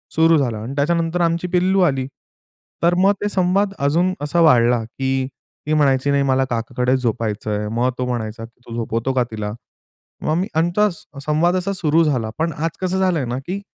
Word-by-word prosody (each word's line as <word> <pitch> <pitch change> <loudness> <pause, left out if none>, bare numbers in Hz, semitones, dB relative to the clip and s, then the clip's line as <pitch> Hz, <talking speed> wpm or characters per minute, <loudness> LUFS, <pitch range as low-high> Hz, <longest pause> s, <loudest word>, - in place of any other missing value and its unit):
सुरू 165 0 +5
झालं 120 -6 0
आणि 115 +6 -6
त्याच्यानंतर 165 +3 0
आमची 170 +1 +1
पिल्लू 185 +2 +2
आली. 135 -6 +1 0.8
तर 170 +1 +4
मग 195 +2 +4
ते 205 - 0
संवाद 195 +1 +1
अजून 170 +7 +2
असा 145 +4 0
वाढला 120 -6 +4
की 130 +3 -2 0.4
ती 155 - +1
म्हणायची, 140 -2 +2
"नाही, 140 0 +2
मला 135 -1 +2
काकाकडे 125 +1 -1
झोपायचं 110 -3 -2
आहे," 105 0 -2
मग 120 +2 +2
तो 125 - -1
म्हणायचा 115 -2 -4
की 115 - -20
"तू 115 - -8
झोपवतो 115 +2 -2
का 125 -1 +2
तिला?" 105 -1 -4 0.7
मग 155 - +1
मी 190 +3 0
आमचा 175 +6 +2 0.4
संवाद 165 +4 +2
असा 190 +2 -1
सुरु 165 -2 +2
झाला. 125 -8 0
पण 165 0 0
आज 165 +2 -1
कसं 185 +1 0
झालंय 180 -7 +1
ना, 120 +1 -3
की 185 +9 -5
145 Hz, 190 wpm, -20 LUFS, 125-175 Hz, 0.8 s, सुरू